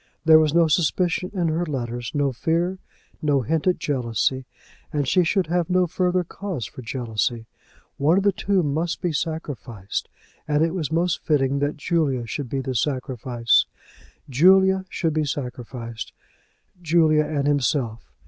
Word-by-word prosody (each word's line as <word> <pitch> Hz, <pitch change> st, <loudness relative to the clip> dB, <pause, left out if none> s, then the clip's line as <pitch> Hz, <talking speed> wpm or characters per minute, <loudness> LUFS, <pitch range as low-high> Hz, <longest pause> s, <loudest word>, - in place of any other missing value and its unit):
There 160 Hz, 0 st, +8 dB
was 155 Hz, -2 st, +2 dB
no 170 Hz, +1 st, +4 dB
suspicion 175 Hz, +3 st, +1 dB
in 175 Hz, -5 st, 0 dB
her 160 Hz, +2 st, 0 dB
letter, 120 Hz, -6 st, -3 dB
no 140 Hz, -1 st, +1 dB
fear, 170 Hz, +7 st, -1 dB, 0.4 s
no 145 Hz, -3 st, +2 dB
hint 160 Hz, +6 st, -1 dB
at 180 Hz, -, +3 dB
jealousy. 130 Hz, -3 st, -1 dB, 0.4 s
And 145 Hz, -3 st, -1 dB
she 180 Hz, +6 st, +4 dB
should 185 Hz, +3 st, +1 dB
have 175 Hz, 0 st, -1 dB
no 185 Hz, 0 st, +3 dB
further 180 Hz, +1 st, 0 dB
cause 175 Hz, -, -5 dB
for 130 Hz, -, -10 dB
jealousy! 115 Hz, -1 st, -2 dB, 0.5 s
One 155 Hz, +6 st, +3 dB
of 195 Hz, -, +2 dB
the 200 Hz, -, +4 dB
two 195 Hz, -1 st, 0 dB
must 160 Hz, +4 st, -1 dB
be 175 Hz, -3 st, -1 dB
sacrificed, 140 Hz, -, -4 dB, 0.4 s
and 150 Hz, +1 st, +2 dB
it 165 Hz, 0 st, 0 dB
was 160 Hz, -6 st, -3 dB
most 170 Hz, +1 st, 0 dB
fitting 140 Hz, -3 st, +1 dB
that 145 Hz, +1 st, -1 dB
Julia 145 Hz, -6 st, 0 dB
should 130 Hz, +2 st, -5 dB
be 135 Hz, +1 st, -2 dB
the 130 Hz, 0 st, -3 dB
sacrifice. 125 Hz, -2 st, +1 dB, 0.6 s
Julia 190 Hz, +7 st, +4 dB
should 165 Hz, -5 st, -1 dB
be 155 Hz, 0 st, +1 dB
sacrificed, 125 Hz, -4 st, -6 dB, 0.7 s
Julia 155 Hz, -2 st, +3 dB
and 145 Hz, -3 st, -1 dB
himself! 125 Hz, -, 0 dB
150 Hz, 155 wpm, -23 LUFS, 130-170 Hz, 0.7 s, There